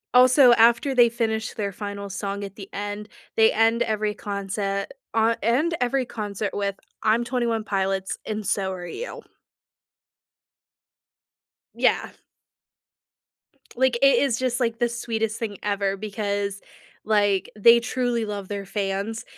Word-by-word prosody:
also, 255 Hz, 0 st, +7 dB
after 235 Hz, +4 st, +4 dB
they 240 Hz, -2 st, +6 dB
finish 225 Hz, -1 st, -2 dB
their 200 Hz, -2 st, -2 dB
final 200 Hz, 0 st, -6 dB
song 200 Hz, +1 st, -4 dB
at 195 Hz, -1 st, -7 dB
the 195 Hz, -2 st, -10 dB
end, 205 Hz, +1 st, -5 dB, 0.3 s
they 220 Hz, 0 st, +5 dB
end 225 Hz, +1 st, +3 dB
every 215 Hz, -1 st, -1 dB
concer 200 Hz, -1 st, -3 dB, 0.3 s
o 225 Hz, +1 st, +3 dB
end 280 Hz, +10 st, +2 dB
every 255 Hz, +1 st, +1 dB
concert 210 Hz, -3 st, -4 dB
with 200 Hz, -1 st, -1 dB, 0.3 s
"I'm 220 Hz, +2 st, +3 dB
Twenty 240 Hz, 0 st, -1 dB
One 225 Hz, -2 st, -1 dB
Pilots, 195 Hz, -1 st, -1 dB
and 215 Hz, -1 st, -4 dB
so 190 Hz, 0 st, 0 dB
are 180 Hz, -1 st, -7 dB
you." 480 Hz, -, -7 dB, 2.5 s
Yeah. -, -, +1 dB, 1.7 s
Like, 260 Hz, -1 st, +2 dB
it 275 Hz, -, +6 dB
is 265 Hz, -5 st, +1 dB
just 255 Hz, 0 st, -1 dB
like, 230 Hz, -2 st, 0 dB
the 240 Hz, -, +2 dB
sweetest 225 Hz, -2 st, -2 dB
thing 210 Hz, -4 st, -4 dB
ever 200 Hz, -1 st, 0 dB
because, 200 Hz, -1 st, -3 dB, 0.4 s
like, 205 Hz, -2 st, +2 dB
they 235 Hz, +3 st, +7 dB
truly 240 Hz, -1 st, -1 dB
love 205 Hz, -2 st, -5 dB
their 200 Hz, -1 st, -5 dB
fans, 200 Hz, +2 st, -3 dB
215 Hz, 135 wpm, -24 LUFS, 200-235 Hz, 2.5 s, also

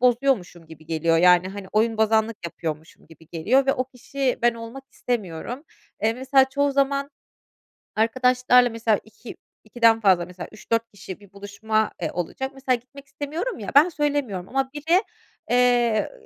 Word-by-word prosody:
bozuyormuşum 240 Hz, -9 st, +1 dB
gibi 160 Hz, -1 st, -14 dB
geliyor 165 Hz, 0 st, +1 dB
yani, 180 Hz, +1 st, +5 dB
hani, 195 Hz, 0 st, -8 dB
oyunbozanlık 220 Hz, 0 st, +2 dB
yapıyormuşum 160 Hz, -1 st, -6 dB
gibi 160 Hz, 0 st, -18 dB
geliyor 230 Hz, +12 st, +1 dB
ve 270 Hz, -, +4 dB
o 255 Hz, -, -2 dB
kişi 260 Hz, +1 st, -3 dB
ben 240 Hz, 0 st, +3 dB
olmak 230 Hz, +4 st, -9 dB
istemiyorum. 235 Hz, -, -4 dB, 0.4 s
Eee, 220 Hz, +1 st, +3 dB
mesela 265 Hz, +2 st, +3 dB
çoğu 285 Hz, +1 st, 0 dB
zaman 275 Hz, 0 st, 0 dB, 0.9 s
arkadaşlarla 250 Hz, +2 st, +3 dB
mesela 225 Hz, -2 st, +1 dB
iki 220 Hz, +2 st, -12 dB, 0.3 s
ikiden 225 Hz, 0 st, +3 dB
fazla 185 Hz, -5 st, +3 dB
mesela 180 Hz, 0 st, -9 dB
3-4 230 Hz, +1 st, -2 dB
kişi 190 Hz, -1 st, -9 dB
bir 200 Hz, -2 st, -18 dB
buluşma, 210 Hz, +2 st, -2 dB
eee, -, -, -1 dB
olacak; 180 Hz, +10 st, -4 dB
mesela 265 Hz, -2 st, 0 dB
gitmek 270 Hz, +4 st, -15 dB
istemiyorum 320 Hz, -, -5 dB
ya, 200 Hz, -4 st, -6 dB
ben 295 Hz, +5 st, +7 dB
söylemiyorum 285 Hz, -, -2 dB
ama 270 Hz, 0 st, -1 dB
biri, 330 Hz, +7 st, +2 dB, 0.5 s
eee, 245 Hz, -3 st, +3 dB
ııı, -, -, -18 dB
230 Hz, 150 wpm, -23 LUFS, 200-265 Hz, 0.9 s, ben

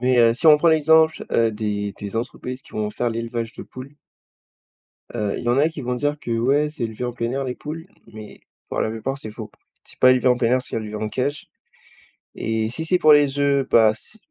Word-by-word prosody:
Mais, 125 Hz, 0 st, +2 dB
heu, 115 Hz, -1 st, +6 dB
si 160 Hz, +8 st, -1 dB
on 150 Hz, -1 st, +9 dB
prend 165 Hz, +3 st, +2 dB
l'exemple, 160 Hz, 0 st, +3 dB
heu, 115 Hz, -1 st, +2 dB
des 105 Hz, -1 st, -3 dB
des 100 Hz, +1 st, -5 dB
entreprises 125 Hz, +3 st, -5 dB
qui -, -, -17 dB
vont 105 Hz, -1 st, -2 dB
faire 120 Hz, +3 st, -2 dB
l'élevage 115 Hz, 0 st, -4 dB
de -, -, -9 dB
poules. 130 Hz, +3 st, -11 dB, 1.2 s
Heu, 105 Hz, -2 st, -2 dB
il -, -, -7 dB
y -, -, +1 dB
en 125 Hz, -, +2 dB
a 155 Hz, +3 st, +3 dB
qui 160 Hz, -3 st, -8 dB
vont 125 Hz, 0 st, -2 dB
dire 145 Hz, +3 st, -1 dB
que 120 Hz, -, -6 dB
ouais, 140 Hz, +5 st, +2 dB
c'est 150 Hz, -6 st, -6 dB
élevé 110 Hz, +2 st, -4 dB
en 120 Hz, -, -4 dB
plein 115 Hz, 0 st, -3 dB
air 135 Hz, +1 st, -2 dB
les 125 Hz, -1 st, -4 dB
poules. 160 Hz, +3 st, -7 dB, 0.3 s
Mais 110 Hz, -1 st, -11 dB, 0.3 s
pour -, -, -1 dB
la -, -, 0 dB
plupart, 115 Hz, +5 st, -4 dB
c'est 110 Hz, -6 st, -7 dB
faux. 110 Hz, -1 st, -8 dB, 0.3 s
C'est -, -, -12 dB
pas 130 Hz, 0 st, +7 dB
élevé 130 Hz, 0 st, +2 dB
en 125 Hz, -, +5 dB
plein 120 Hz, -1 st, +1 dB
air, 130 Hz, -, +2 dB
c'est -, -, -5 dB
élevé 110 Hz, -1 st, -4 dB
en 110 Hz, 0 st, -3 dB
cage 140 Hz, +4 st, -3 dB, 0.9 s
et 110 Hz, -1 st, -1 dB
si 160 Hz, -, -2 dB
c'est 180 Hz, +2 st, +2 dB
pour 155 Hz, -3 st, +6 dB
les 145 Hz, -1 st, +3 dB
œufs, 140 Hz, -1 st, +1 dB
bah, 110 Hz, -2 st, +5 dB
c 110 Hz, -, -9 dB
125 Hz, 240 wpm, -22 LUFS, 115-145 Hz, 1.2 s, on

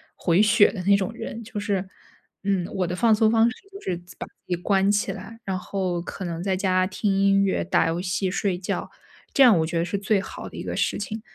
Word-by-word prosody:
回 175 Hz, +3 st, +2 dB
血 215 Hz, 0 st, +5 dB
的 195 Hz, -, -5 dB
那 200 Hz, +2 st, +5 dB
种 200 Hz, +2 st, -1 dB
人。 230 Hz, 0 st, -7 dB
就 215 Hz, -1 st, -6 dB
是， 200 Hz, -2 st, -1 dB, 0.6 s
嗯， 195 Hz, -3 st, 0 dB
我 185 Hz, -2 st, 0 dB
的 175 Hz, -, -3 dB
放 225 Hz, +3 st, +4 dB
松 215 Hz, 0 st, +4 dB
方 225 Hz, 0 st, +4 dB
式 240 Hz, -, -7 dB, 0.2 s
就 395 Hz, -, -9 dB
是 180 Hz, -2 st, -2 dB, 0.2 s
把 -, -, -5 dB
自 -, -, -22 dB
己 180 Hz, -, 0 dB
关 195 Hz, +2 st, +1 dB
起 205 Hz, 0 st, +1 dB
来， 225 Hz, -, -9 dB
然 190 Hz, -3 st, -2 dB
后 185 Hz, -2 st, -2 dB
可 185 Hz, -, -7 dB
能 170 Hz, -2 st, -4 dB
在 190 Hz, +1 st, 0 dB
家 185 Hz, -1 st, +1 dB
听 200 Hz, +2 st, -1 dB
音 195 Hz, 0 st, +3 dB
乐， 195 Hz, -, +1 dB
打 170 Hz, -2 st, +2 dB
游 170 Hz, +2 st, -2 dB
戏， 185 Hz, +1 st, -1 dB
睡 190 Hz, -1 st, -1 dB
觉， 180 Hz, -, -3 dB, 0.4 s
这 275 Hz, -, +6 dB
样 235 Hz, -7 st, +7 dB
我 160 Hz, -, +1 dB
觉 165 Hz, +1 st, -3 dB
得 165 Hz, -, +1 dB
是 190 Hz, +3 st, -2 dB
最 200 Hz, 0 st, +1 dB
好 -, -, -8 dB
的 -, -, -12 dB
一 -, -, -5 dB
个 -, -, -4 dB
事 -, -, 0 dB
情。 215 Hz, +2 st, -5 dB
195 Hz, 265 characters per minute, -24 LUFS, 180-210 Hz, 0.6 s, 样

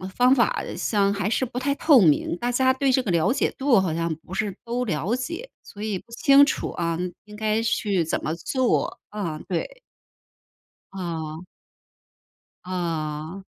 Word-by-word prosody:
方 250 Hz, +2 st, +5 dB
法 240 Hz, -, +1 dB
上 200 Hz, -2 st, +1 dB
还 200 Hz, -1 st, -1 dB
是 260 Hz, -, +1 dB
不 250 Hz, 0 st, -8 dB
太 280 Hz, +2 st, +1 dB
透 290 Hz, -3 st, +6 dB
明， 170 Hz, -1 st, +3 dB
大 245 Hz, +4 st, -1 dB
家 260 Hz, +1 st, +3 dB
对 270 Hz, 0 st, +1 dB
这 260 Hz, -, +3 dB
个 240 Hz, -, -5 dB
了 170 Hz, +8 st, +2 dB
解 -, -, +1 dB
度 265 Hz, -5 st, +4 dB
好 185 Hz, -3 st, 0 dB
像 165 Hz, 0 st, -1 dB
不 180 Hz, -, -11 dB
是 205 Hz, -2 st, -1 dB
都 245 Hz, +2 st, -2 dB
了 185 Hz, -, -1 dB
解， 335 Hz, -, -5 dB
所 205 Hz, -, -12 dB
以 215 Hz, -2 st, -1 dB
不 230 Hz, -, -15 dB
清 275 Hz, +4 st, +6 dB
楚 300 Hz, -, -2 dB
啊， 170 Hz, -1 st, -2 dB, 0.3 s
应 210 Hz, 0 st, -12 dB
该 215 Hz, +1 st, 0 dB
去 200 Hz, -6 st, +1 dB
怎 160 Hz, -, -2 dB
么 155 Hz, -, -1 dB
做 250 Hz, -, 0 dB
啊 180 Hz, -7 st, -4 dB
对。 350 Hz, -, -3 dB, 1.1 s
哦。 165 Hz, -3 st, -5 dB, 1.2 s
哦。 165 Hz, -1 st, -3 dB
210 Hz, 175 characters per minute, -24 LUFS, 170-250 Hz, 1.2 s, 透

